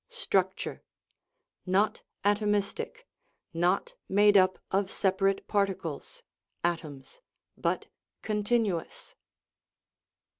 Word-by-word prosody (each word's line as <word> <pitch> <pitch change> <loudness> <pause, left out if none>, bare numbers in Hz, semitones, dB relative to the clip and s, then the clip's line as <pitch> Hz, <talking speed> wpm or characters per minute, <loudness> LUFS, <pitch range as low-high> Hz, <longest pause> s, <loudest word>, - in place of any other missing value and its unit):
Structure: 190 - -1 0.9
Not 195 +4 +2 0.2
atomistic, 205 - 0 0.5
not 175 +3 +1 0.2
made 205 +1 +5
up 185 -1 +5
of 195 0 +1
separate 195 0 +1
particles 195 -7 -2 0.4
(atoms), 165 - -3 0.3
but - - -1 0.4
continuous. 210 -4 -1
195 Hz, 70 wpm, -29 LUFS, 185-205 Hz, 0.9 s, made